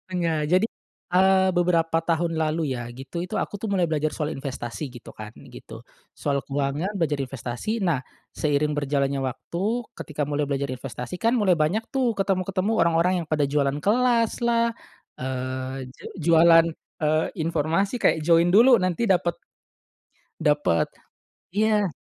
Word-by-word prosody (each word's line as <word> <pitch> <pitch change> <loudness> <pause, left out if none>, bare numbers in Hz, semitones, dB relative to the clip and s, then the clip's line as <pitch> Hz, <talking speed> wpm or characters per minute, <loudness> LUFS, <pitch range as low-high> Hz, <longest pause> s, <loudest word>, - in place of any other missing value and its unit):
enggak 170 -3 0
jadi, 185 +5 +4 0.5
eee, 190 0 +5
beberapa 165 -2 +2
tahun 165 0 0
lalu 155 -3 0
ya 120 -1 -6
gitu 135 +7 -6
itu 180 - -3
aku - - -3
tuh 205 +1 -4
mulai 185 -3 +2
belajar 155 -1 0
soal 155 0 -3
investasi 135 0 -5
gitu 120 -1 -12
kan 105 0 -8 0.2
gitu, - - -11 0.2
soal 140 -1 -2
keuangan 145 +6 -2
belajar 150 -4 0
investasi 130 - -4
nah 150 -7 +1 0.3
seiring 150 0 0
berjalannya 140 -1 0
waktu 135 +7 -4 0.4
ketika 150 -1 -3
mulai 150 +1 -1
belajar 140 0 0
investasi 130 +6 -7
kan 230 +2 +3
mulai 195 -4 +4
banyak 170 +8 0
tuh 245 -5 +1
ketemu-ketemu 195 +1 0
orang-orang 170 +2 +3
yang - - -10
pada 150 -2 +2
jualan 140 0 0
kelaslah, 235 +3 +2 0.5
eee, 130 0 -4
je - - -17 0.2
jualan, 165 0 +7 0.3
eee, 155 +1 +1
informasi 165 - 0
kayak - - +4
join 170 0 +5
dulu 235 +7 +7
nanti 185 +5 0
dapet 175 -3 +1 1.0
Dapet, 145 - +2 0.6
iya. 210 -1 +2
165 Hz, 140 wpm, -24 LUFS, 140-185 Hz, 1.0 s, jualan